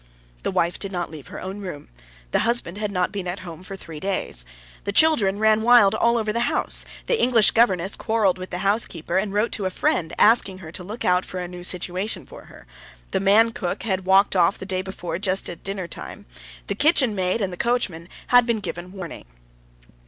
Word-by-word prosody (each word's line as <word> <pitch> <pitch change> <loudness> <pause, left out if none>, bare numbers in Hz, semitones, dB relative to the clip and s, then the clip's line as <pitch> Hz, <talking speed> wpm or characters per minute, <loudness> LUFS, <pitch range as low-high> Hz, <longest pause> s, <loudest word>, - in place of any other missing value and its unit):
The - - -2
wife 170 +1 0
did 195 - -4
not 175 -3 -3
leave 155 -4 -10
her - - -8
own 190 +2 -6
room, 180 -8 -8 0.4
the - - +2
husband 225 -5 0
had 210 -1 -2
not 180 -2 0
been 195 -3 -5
at 180 +2 -4
home 170 -3 -9
for 190 +1 -8
three 165 -5 -9
days. 165 - -2 0.4
The - - -1
children 205 -7 +4
ran 220 0 +3
wild 230 -4 +6
all 235 +2 +2
over 215 -2 -1
the 235 - -1
house; - - +2 0.2
the 475 - +1
English 235 -4 +5
governess 195 -5 +2
quarreled 215 -5 +1
with 185 - -7
the 180 - -4
housekeeper, 190 -4 +1
and 200 0 -3
wrote 210 +3 0
to 200 - -2
a - - -1
friend 170 -2 0
asking 210 -4 +4
her 165 -4 -10
to 180 - -6
look 210 +6 -6
out 180 0 +3
for 185 - -6
a 180 - -4
new 175 0 -9
situation 180 +3 -2
for - - -13
her; - - -15 0.5
the - - +1
man 210 +4 +4
cook 180 -5 -4
had 190 -4 -1
walked 195 +1 +4
off 175 +1 +3
the - - -7
day 185 -1 -2
before 185 -2 -5
just 190 -1 0
at 170 - -11
dinner 195 -2 -4
time; - - -9 0.4
the - - -2
kitchen 285 -7 +3
maid, 185 +1 0
and 195 -4 -2
the - - -5
coachman 190 -7 -1 0.2
had 245 -1 +5 0.2
given 175 -1 -6
warning. 180 -4 -8
190 Hz, 210 wpm, -23 LUFS, 180-215 Hz, 0.5 s, wild